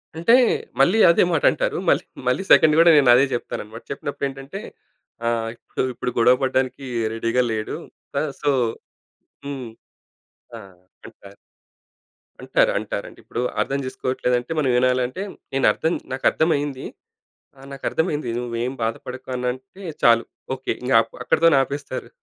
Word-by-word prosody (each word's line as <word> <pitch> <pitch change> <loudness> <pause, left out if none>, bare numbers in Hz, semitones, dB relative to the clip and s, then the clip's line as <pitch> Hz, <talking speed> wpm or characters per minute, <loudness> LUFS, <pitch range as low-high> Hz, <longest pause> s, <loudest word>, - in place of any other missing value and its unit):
అంటే 170 +8 +3 0.5
మళ్ళీ 185 +5 +4
అదే 170 - +5
మాట 160 -3 0
అంటారు. - - -2
మళ్ళీ, - - +3 0.2
మళ్ళీ 125 +9 +1
సెకండ్ 155 -1 +7
కూడా 170 0 +7
నేనదే 130 -1 +6
చెప్తానన్నమాట. 115 -1 -6
చెప్పినప్పుడు 140 0 -3
ఏంటంటే 135 +1 -8 0.7
ఆహ్, 115 -1 -1 0.4
ఇప్పుడు 125 - -3
గొడవ 120 +2 +6
పడడానికి 130 0 -1 0.3
రెడీగా 115 +2 0
లేడు. 110 -1 -3 0.7
సో, 145 - +1 1.0
హ్మ్ 140 -2 -5 0.9
ఆ! - - -7 0.5
అంటారు. 100 0 -15 1.1
అంటారు, - - +2
అంటారండి. - - -6
ఇప్పుడు 120 - -4 0.2
అర్థం 140 +1 -1
చేసుకోవట్లేదంటే 125 0 -2
మనం 140 -4 +1
వినాలంటే 125 +4 +1 0.3
నేను 135 0 +1
అర్థం 160 +9 -1 0.2
నాకు 130 0 -4
అర్థమైంది. 145 -4 0 0.7
"ఆ! - - -18
నాకు 135 -1 -10
అర్థమైంది 155 -6 -1
నువ్వేం 120 +1 -3
బాధపడకు" 125 +3 -5
అని 125 0 -2
అంటే 130 +9 -12 0.2
చాలు 115 0 +5 0.3
ఓకే. 130 - -4
ఇంక 130 - 0 0.3
అక్కడితోనే 165 +3 +4
ఆపేస్తారు. 140 +2 -6
130 Hz, 125 wpm, -22 LUFS, 120-145 Hz, 1.1 s, సెకండ్